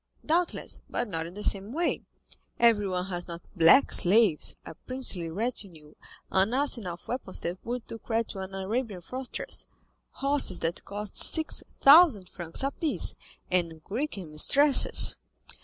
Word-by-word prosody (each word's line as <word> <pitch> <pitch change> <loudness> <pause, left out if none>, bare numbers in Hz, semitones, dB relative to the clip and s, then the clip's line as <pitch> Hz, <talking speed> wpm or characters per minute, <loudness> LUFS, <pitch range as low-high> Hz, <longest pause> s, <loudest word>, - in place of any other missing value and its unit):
"Doubtless, 340 +2 -2
but - - -3
not 165 -4 -4
in 175 - -12
the 210 - -6
same 200 +2 -1
way; 335 +6 -1 0.6
everyone 205 -6 +2
has 175 -2 -5
not 170 0 -8
black 170 +10 +5
slaves, 195 -3 +3
a - - -8
princely 195 -5 -1
retinue, 175 -6 -5 0.4
an 195 +6 +1
arsenal 235 -10 -1
of - - -22
weapons 240 -6 -4
that 175 +2 -5
would 240 0 -5
do 225 - -8
credit 230 0 -2
to 195 - -7
an 190 0 -7
Arabian 200 0 -4
fortress, 255 +8 -4 0.5
horses 275 -9 +2
that 165 +1 -3
cost 205 0 -6
six 320 -1 +2 0.2
thousand 275 - +6
francs 170 +6 -5
apiece, 280 +3 0 0.4
and 165 -3 -2
Greek 250 - -4
mistresses." 195 - +5
205 Hz, 140 wpm, -27 LUFS, 175-255 Hz, 0.6 s, thousand